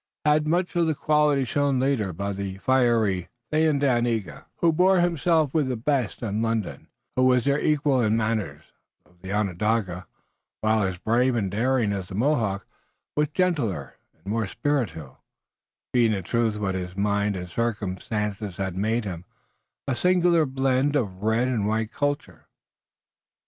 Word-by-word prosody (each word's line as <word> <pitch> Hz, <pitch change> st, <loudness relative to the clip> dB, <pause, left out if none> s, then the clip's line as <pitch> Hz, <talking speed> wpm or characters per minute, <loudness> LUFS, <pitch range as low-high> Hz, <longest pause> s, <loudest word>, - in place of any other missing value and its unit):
He 150 Hz, -, +4 dB
had 150 Hz, 0 st, +2 dB
much 175 Hz, +3 st, 0 dB
of 170 Hz, -1 st, +2 dB
the 160 Hz, -, +1 dB
quality 150 Hz, -2 st, +2 dB
shown 140 Hz, +1 st, +1 dB
later 130 Hz, -7 st, 0 dB
by 100 Hz, +4 st, -3 dB
the 95 Hz, -1 st, -5 dB
fiery 115 Hz, -6 st, +2 dB, 0.2 s
Thayendanegea, 120 Hz, -, +1 dB
who 165 Hz, -1 st, +2 dB
bore 185 Hz, +3 st, +4 dB
himself 165 Hz, -3 st, +2 dB
with 150 Hz, -4 st, +2 dB
the 130 Hz, -, -1 dB
best 125 Hz, -1 st, -1 dB
in 110 Hz, -1 st, -1 dB
London 115 Hz, -3 st, -1 dB
and -, -, -44 dB, 0.3 s
who 130 Hz, -, +3 dB
was 125 Hz, -1 st, +3 dB
their 140 Hz, +1 st, +2 dB
equal 145 Hz, -4 st, +2 dB
in 110 Hz, -1 st, +2 dB
manners, 110 Hz, -2 st, -2 dB, 0.4 s
though 90 Hz, -, -26 dB
the 95 Hz, +1 st, -7 dB
Onondaga, 100 Hz, -1 st, -1 dB, 0.5 s
while 110 Hz, 0 st, +2 dB
as 95 Hz, -2 st, -1 dB
brave 120 Hz, +6 st, +1 dB
and 100 Hz, -5 st, -1 dB
daring 115 Hz, 0 st, +1 dB
as 95 Hz, -2 st, -4 dB
the 95 Hz, -, -8 dB
Mohawk, 110 Hz, -5 st, 0 dB, 0.5 s
was 150 Hz, 0 st, +2 dB
gentler 145 Hz, -, -1 dB, 0.2 s
and 80 Hz, -, -34 dB
more 110 Hz, +1 st, -1 dB
spiritual, 95 Hz, -, -2 dB, 0.7 s
being, 120 Hz, -3 st, +4 dB
in 95 Hz, -2 st, -3 dB
truth, 115 Hz, +2 st, 0 dB
what 100 Hz, -2 st, -1 dB
his 90 Hz, 0 st, -5 dB
mind 100 Hz, 0 st, +1 dB
and 90 Hz, -1 st, -5 dB
circumstances 105 Hz, -1 st, -3 dB
had 95 Hz, -2 st, -3 dB
made 110 Hz, +4 st, 0 dB
him, 90 Hz, -3 st, -5 dB, 0.6 s
a 135 Hz, -, 0 dB
singular 175 Hz, -1 st, +3 dB
blend 135 Hz, +2 st, +1 dB
of 100 Hz, -9 st, -1 dB
red 110 Hz, +3 st, +1 dB
and 115 Hz, -5 st, 0 dB
white 110 Hz, +1 st, -1 dB
culture. 145 Hz, 0 st, -3 dB
115 Hz, 160 wpm, -25 LUFS, 100-140 Hz, 0.7 s, He